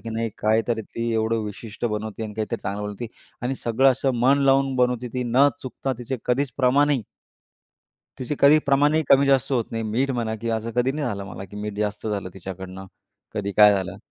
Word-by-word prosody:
की 115 Hz, -, -8 dB
नाही 115 Hz, +1 st, -1 dB
काहीतरी 110 Hz, +1 st, +1 dB
ती 115 Hz, +2 st, -4 dB
एवढं 110 Hz, 0 st, 0 dB
विशिष्ट 105 Hz, +2 st, -7 dB
बनवते 110 Hz, 0 st, -3 dB
आणि 105 Hz, -1 st, -6 dB
काहीतरी 110 Hz, +1 st, -3 dB
चांगलं 100 Hz, +1 st, -3 dB
बनवते 105 Hz, +3 st, -5 dB, 0.4 s
आणि 130 Hz, +2 st, -1 dB
सगळं 130 Hz, +3 st, +3 dB
असं 135 Hz, +1 st, 0 dB
मन 135 Hz, +3 st, +4 dB
लावून 135 Hz, 0 st, +3 dB
बनवते 125 Hz, -1 st, +1 dB
ती 125 Hz, -, -1 dB
न 135 Hz, +4 st, +5 dB
चुकता 130 Hz, +1 st, -3 dB
तिचे 125 Hz, +2 st, -4 dB
कधीच 130 Hz, +1 st, 0 dB
प्रमाणही. 140 Hz, 0 st, +3 dB, 1.2 s
तिचे 130 Hz, +3 st, -3 dB
कधी 145 Hz, +2 st, +7 dB
प्रमाणही 145 Hz, +3 st, +3 dB
कमी-जास्त 135 Hz, -1 st, +4 dB
होत 120 Hz, -3 st, +2 dB
नाही. 115 Hz, 0 st, -3 dB
मीठ 120 Hz, +5 st, 0 dB
म्हणा, 115 Hz, -3 st, -1 dB
की 115 Hz, +2 st, -5 dB
असं 115 Hz, +1 st, -2 dB
कधी 125 Hz, +2 st, +2 dB
नाही 150 Hz, 0 st, -2 dB
झालं 100 Hz, -1 st, -4 dB
मला, 95 Hz, -, -8 dB
की 100 Hz, +2 st, -12 dB
मीठ 105 Hz, 0 st, -4 dB
जास्त 105 Hz, +1 st, -2 dB
झालं 100 Hz, -3 st, -2 dB
तिच्याकडनं 95 Hz, 0 st, -8 dB, 0.5 s
कधी 100 Hz, -1 st, -2 dB
काय 105 Hz, -1 st, +8 dB
झालं. 95 Hz, -1 st, -3 dB
115 Hz, 190 wpm, -24 LUFS, 105-135 Hz, 1.2 s, काय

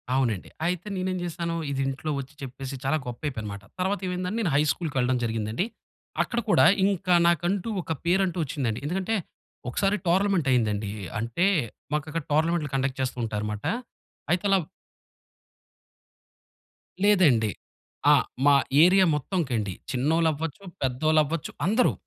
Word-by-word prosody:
అవునండి. 120 Hz, -8 st, 0 dB, 0.2 s
అయితే 180 Hz, +2 st, -1 dB
నేనేం 185 Hz, 0 st, -1 dB
జేశానూ, 170 Hz, -1 st, -3 dB, 0.2 s
ఇదింట్లో 135 Hz, +2 st, -2 dB
ఒచ్చి 135 Hz, +2 st, -8 dB
చెప్పేసి 135 Hz, +1 st, -6 dB
చాలా 145 Hz, +4 st, +2 dB
గొప్పయిపోయానమాట. 115 Hz, -5 st, -5 dB, 0.2 s
తర్వాతేవైందంటే, 185 Hz, +1 st, -1 dB
నేను 180 Hz, -8 st, 0 dB
హై 145 Hz, -, +5 dB
స్కూలుకు 160 Hz, -5 st, -4 dB
వెళ్ళడం 125 Hz, 0 st, +2 dB
జరిగిందండి. 110 Hz, -, -1 dB, 0.6 s
అక్కడ 240 Hz, -, -2 dB
కూడా -, -, +6 dB, 0.2 s
ఇంక 195 Hz, -1 st, -1 dB, 0.2 s
నాకంటూ 175 Hz, +5 st, +1 dB
ఒక 165 Hz, -, -7 dB
పేరంటూ 185 Hz, 0 st, +2 dB
ఒచ్చిందండి. 125 Hz, -6 st, -2 dB
ఎందుకంటే, 185 Hz, +7 st, -1 dB, 0.5 s
ఒకసారి 195 Hz, +10 st, +1 dB
టోర్నమెంటయిందండీ. 130 Hz, -, +2 dB, 0.3 s
అంటే, 115 Hz, -, 0 dB, 0.5 s
మాకక్కడ 155 Hz, +1 st, -2 dB
టోర్నమెంట్లు 160 Hz, -1 st, +1 dB
కండక్ట్ 135 Hz, 0 st, -1 dB
చేస్తూ 130 Hz, -1 st, -2 dB
ఉంటారుమాట. 105 Hz, -1 st, -3 dB, 0.7 s
అయితే 180 Hz, +3 st, +1 dB
లవ్ 190 Hz, -4 st, +3 dB, 2.4 s
లేదండి. 160 Hz, -, +5 dB, 0.6 s
ఆ! -, -, +8 dB, 0.3 s
మా 145 Hz, -1 st, +7 dB, 0.3 s
ఏరియా 185 Hz, +2 st, +6 dB
మొత్తంకండి. 130 Hz, -, -1 dB, 0.2 s
చిన్నోళ్ళవ్వచ్చు, 160 Hz, +4 st, 0 dB, 0.2 s
పెద్దోళ్ళవ్వచ్చు 155 Hz, +4 st, +1 dB, 0.2 s
అందరూ. 220 Hz, +5 st, +3 dB
155 Hz, 110 wpm, -26 LUFS, 130-180 Hz, 2.4 s, ఆ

